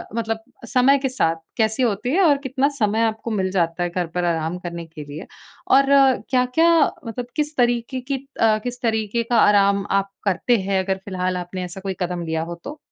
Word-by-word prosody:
मतलब, 225 -1 -2 0.3
समय 270 +2 +4
के 265 -1 -1
साथ 165 -10 +1 0.2
कैसी 220 +3 +1
होती 225 +1 0
है? 390 - +3
और 290 -4 +5
कितना 265 +1 +1
समय 220 0 +1
आपको 225 +1 -3
मिल 190 -3 0
जाता 175 -1 0
है, 175 - -1
घर 175 -1 -2
पर 180 - 0
आराम 165 +1 -1
करने 170 -1 -6
के 155 -2 -10
लिए? 145 +4 -8 0.4
और 275 +1 +5 0.4
क्या-क्या 255 +6 +3 0.4
मतलब 240 +2 -5
किस 300 0 -2
तरीके 240 +1 +1
की 275 +2 -3 0.3
अ, 220 -1 +4
किस 245 0 -5
तरीके 220 0 0
का 235 0 0
आराम 200 -1 +4
आप 195 0 +1 0.2
करते 200 +5 +2
हैं, 190 0 0
अगर 190 0 -1
फ़िलहाल 185 -1 -2
आपने 180 +1 -5
ऐसा 185 +2 -9
कोई 195 -1 -3
कदम 175 -1 -2
लिया 160 0 -1
हो 170 +1 -6
तो? 295 +2 -8
210 Hz, 200 wpm, -22 LUFS, 180-245 Hz, 0.4 s, और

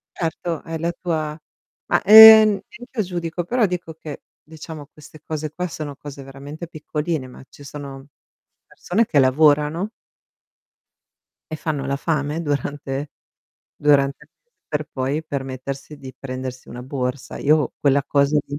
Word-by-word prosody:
Certo, 165 -1 -3
hai 165 0 -5
la 170 +2 -1
tua 160 -3 -3 0.5
ma, - - +3
ehm, 220 +1 +11 0.2
neach'io 245 -1 -5
giudico, 175 -1 -4
però 240 +4 +2
dico 180 -3 -4
che, 155 -2 -9 0.2
diciamo 155 -1 -10
queste 155 0 -15
cose 155 -1 -4
qua, 180 +3 -3
sono 150 -3 -6
cose 140 0 -10
veramente 140 +5 -9
piccoline, 155 -2 -4
ma 125 - -13
ci 145 - -15
sono 140 -1 -9 0.6
persone 215 +6 -1
che 150 - +2
lavorano 150 +7 +3 1.6
e - - -2
fanno 150 -3 -3
la 140 - 0
fame 150 +1 -2
durante 145 -1 -3 0.7
durante 140 -2 +2
il - - -38
mese 480 - -54 0.2
per 150 0 -2
poi 135 +4 -2
permettersi 135 +1 -6
di 130 -2 -10
prendersi 130 -1 -7
una 125 +1 -8
borsa. 130 0 -4
Io 150 -1 +2
quella 140 -1 +3
cosa 140 +1 +2
lì 140 - -6
150 Hz, 140 wpm, -21 LUFS, 140-165 Hz, 1.6 s, ehm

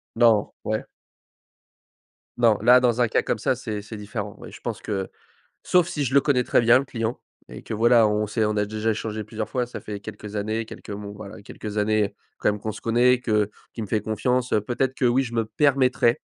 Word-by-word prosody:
Non, 115 -3 +4
ouais. 110 0 -1 1.5
Non, 115 -4 +4
là 125 +2 +7
dans 125 -1 +2
un 120 - +3
cas - - +2
comme 110 - -1
ça, 130 - +1
c'est 110 -4 -5
c'est 105 +2 -8
différent. 105 -1 -6
Oui, - - -10
je - - -12
pense - - -4
que 95 -2 -3 0.5
sauf 180 -2 +3
si 145 - -2
je 130 - -2
le 140 - +7
connais 135 -3 +2
très - - +3
bien 120 +2 +6
le 135 - -2
client, 115 -2 -3 0.3
et - - -10
que - - -7
voilà, 115 0 +5
on 105 0 0
sait 110 +2 0
on 105 0 0
a 105 - +2
déjà 110 +1 -1
échangé 110 -1 -3
plusieurs 110 0 -5
fois 125 -2 -1
ça 125 - -8
fait 105 -1 -7
quelques 105 +1 -8
années, 110 +2 -1
quelques 110 - -11
mon 100 0 -6
voilà, 105 +1 -10
quelques 105 +1 -6
années, 105 0 +2
heu, 100 - -3 0.3
quand - - +2
même 105 0 -4
qu'on 110 - -3
se - - -10
connaît, 125 +2 +3
que 105 -3 +1 0.2
qu'il 110 - -5
me - - -10
fait 110 - +1
confiance, 125 +4 -1
heu, 105 - +4
peut-être 125 +4 -1
que, 130 - -2
oui 125 +2 +4
je 120 -3 -6
me 115 - +1
permettrais 125 0 +2
110 Hz, 230 wpm, -24 LUFS, 105-125 Hz, 1.5 s, là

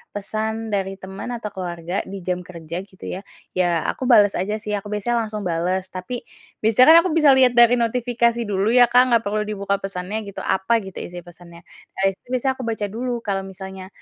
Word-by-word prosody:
pesan 220 +2 -2
dari 195 -1 -1
teman 190 +5 -7
atau 230 -2 -5
keluarga 175 -1 -4
di 195 0 -6
jam 180 0 -2
kerja 170 0 -7
gitu 190 -1 -14
ya, 185 - -5 0.3
ya 175 -3 +1
aku - - -3
bales 205 -4 +6
aja 210 +4 -1
sih, 210 -1 -3
aku 205 +1 -6
biasanya 210 +3 -1
langsung 215 0 -5
bales, 180 +3 -1
tapi 190 +7 -5 0.4
biasanya 225 +5 +5
kan - - +10
aku - - -2
bisa 305 -3 +6
lihat 255 -2 +5
dari 240 0 +7
notifikasi 235 0 +1
dulu 200 +1 0
ya, 245 -1 +7
Kak, 250 0 +5
gak 230 - +2
perlu 210 +1 0
dibuka 200 -1 -1
pesannya 195 +2 -4
gitu, 200 - -7
apa 210 +5 +1
gitu 190 -1 -10
isi 175 -1 -7
pesannya, 175 0 -14 0.3
nah - - -3
itu 190 - -19
biasanya 255 +1 +1
aku 255 - -4
baca 220 -2 -2
dulu 240 +1 -3
kalau 195 -2 -2
misalnya 190 0 -9
205 Hz, 200 wpm, -22 LUFS, 185-230 Hz, 0.4 s, kan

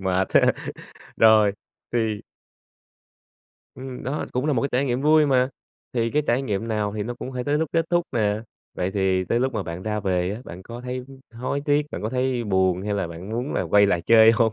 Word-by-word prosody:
mệt 95 0 0
ha. - - +6 0.6
Rồi, 110 -2 +6 0.4
thì 110 -3 0 1.5
Ừm, 130 -1 -8
đó 135 +4 -2
cũng 130 +4 -1
là 150 - +2
một 120 - +1
cái 140 - 0
trải 130 +3 +2
nghiệm 125 0 0
vui 155 0 +5
mà, 130 -1 +3 0.4
thì 115 -2 0
cái 150 - +1
trải 125 +3 +2
nghiệm 110 -2 -2
nào 105 -2 -1
thì 105 - -1
nó 120 +3 -4
cũng 130 +2 -7
phải 125 -1 -3
tới 145 +1 +1
lúc 160 -2 -1
kết 165 -1 +2
thúc 175 0 +3
nè, 105 -2 +1 0.3
vậy 90 +1 -1
thì 95 -1 +1
tới 115 +6 0
lúc 130 0 0
mà 105 - -1
bạn 85 +1 -6
ra 105 -1 -2
về 90 -2 0
á, 115 - -8
bạn 90 +2 -9
có 120 +4 -9
thấy 125 0 -5 0.3
hối 130 +4 -2
tiếc, 145 0 +2
bạn - - -6
có 110 - -1
thấy 125 -2 0
buồn 95 -2 +1
hay 105 0 -2
là 100 - -1
bạn 85 +5 -9
muốn 120 +5 -3
là - - 0
quay 100 0 +4
lại 90 -4 +1
chơi 115 0 +7
hông? 110 -1 +2
115 Hz, 225 wpm, -24 LUFS, 100-130 Hz, 1.5 s, chơi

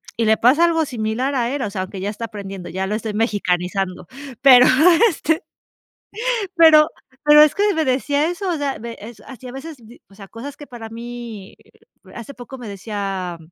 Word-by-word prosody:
y 230 - 0
le 220 0 +3
pasa 270 +10 +4
algo 325 -2 +1
similar 245 +2 -2
a 245 0 -1
él, 285 - -3
o 210 - -2
sea, 195 -1 -4
aunque 190 +1 -7
ya 195 +2 -3
está 215 +2 -5
aprendiendo, 195 -4 -8
ya 190 +2 -3
lo 210 - -2
estoy 220 0 -4
mexicanizando. 190 -4 -2 0.3
Pero, 255 -2 +8 0.4
este, 320 -2 -1 1.1
pero 320 -2 +6 0.3
pero 295 0 +7
es 305 0 +5
que 410 0 +2
me 320 -1 0
decía 285 +3 0
eso, 360 +2 -4
o 340 - -1
sea, 285 -2 -2
ve 235 0 -8
es 220 +1 -11
así 255 -1 -11
a - - -8
veces, 285 +4 -9 0.3
o 195 - -19
sea, 195 -1 -12
cosas 270 +7 -9
que 290 - -11
para 230 -2 -9
mí 230 -3 -9 0.6
hace 235 +4 -9
poco 250 +1 -10
me 245 -3 -9
decía 195 -3 -5
235 Hz, 190 wpm, -20 LUFS, 205-285 Hz, 1.1 s, Pero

